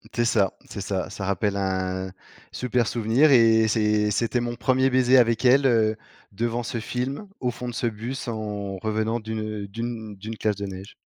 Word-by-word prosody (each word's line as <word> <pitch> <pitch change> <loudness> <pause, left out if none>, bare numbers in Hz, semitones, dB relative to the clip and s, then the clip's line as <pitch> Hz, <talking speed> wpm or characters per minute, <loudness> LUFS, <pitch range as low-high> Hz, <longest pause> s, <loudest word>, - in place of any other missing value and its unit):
C'est 120 - +2
ça 105 -4 +2 0.2
c'est 100 - -6
ça. 95 -2 -2
Ça 100 -1 -6
rappelle 100 +1 0
un 95 -1 -2 0.4
super 125 -2 0
souvenir 120 +6 +3
et 115 -3 +6
c'est 105 -1 +2
c'était 115 +3 0
mon 120 0 -3
1er 130 +2 +2
baiser 130 0 +4
avec 115 -1 +3
elle, 135 +3 +5
heu, 110 -4 +3 0.4
devant 115 +3 -2
ce 120 0 -3
film, 130 - -4
au 125 -2 0
fond 125 +1 -7
de - - -6
ce 120 - -1
bus, 115 +5 -5
en 105 -3 -4
revenant 110 +3 -1
d'une 110 -1 -4
d'une 110 0 -5
d'une 110 +3 -7
classe 105 -2 0
de 100 - -5
neige. 95 0 -8
110 Hz, 185 wpm, -25 LUFS, 105-120 Hz, 0.4 s, et